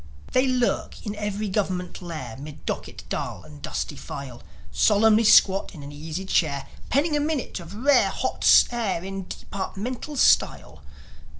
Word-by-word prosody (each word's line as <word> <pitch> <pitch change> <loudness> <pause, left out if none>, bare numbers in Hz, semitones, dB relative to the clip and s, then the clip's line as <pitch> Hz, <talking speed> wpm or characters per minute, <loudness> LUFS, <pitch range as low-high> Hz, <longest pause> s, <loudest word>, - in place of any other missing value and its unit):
They 255 +1 +3
lurk 250 -2 -1
in 210 -1 -3
every 210 0 -3
Gov'ment 185 -2 -2
lair, 155 -10 -6
'Mid 145 +2 -10
docket - - -5
dull - - -4
and 75 -1 -13
dusty - - -4
file, 135 -4 -8 0.3
Solemnly 220 +1 +4
squat 195 -2 +5
in 145 - -9
an 140 - -8
easy 160 +5 -6
chair, 140 -7 +1 0.2
Penning 295 +3 +2
a - - +2
minute 290 -8 -2
of 170 +3 -10
rare 275 +6 +4
hot - - +4
air 215 -8 -1
In 195 -1 -6
departmental 235 +9 -5
style. - - +2
195 Hz, 145 wpm, -25 LUFS, 160-235 Hz, 0.3 s, squat